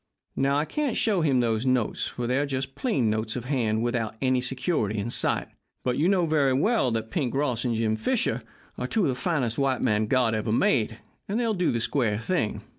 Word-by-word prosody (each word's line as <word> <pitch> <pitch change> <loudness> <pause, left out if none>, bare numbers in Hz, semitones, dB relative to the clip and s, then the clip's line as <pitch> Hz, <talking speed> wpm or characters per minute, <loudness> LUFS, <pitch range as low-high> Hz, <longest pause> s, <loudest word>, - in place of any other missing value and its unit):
Now, 140 +1 +2
I 150 - +1
can't 295 - -1
show 205 -6 +2
him 135 -5 +3
those 115 -1 0
notes, 130 -4 0
for 125 - -4
they're 130 +4 +1
just 135 -1 -3
plain 140 - 0
notes 110 0 -2
of 125 -2 -4
hand 115 -5 0
without 115 -2 -1
any 130 -1 +2
security 130 - -1
in 105 +3 -2
sight, - - +1 0.4
but 125 -1 0
you 160 +7 +2
know 185 -3 +3
very 145 -4 +2
well 180 - +2
that 110 -1 -3
Pink 135 -6 -1
Ross 130 -4 0
and 120 -2 0
Jim 110 -1 +1
Fisher 110 - 0 0.4
are 125 - -2
two 215 - +1
of - - +2
the - - +1
finest 125 -4 -1
white 135 -2 +1
men 105 0 +2
God 125 -2 +2
ever 110 0 -1
made, 110 -1 +2 0.3
and 205 +4 -1
they'll 230 -2 +1
do 180 -3 +1
the 115 - -1
square 115 -3 +1
thing. 115 - -1
130 Hz, 215 wpm, -26 LUFS, 115-145 Hz, 0.4 s, him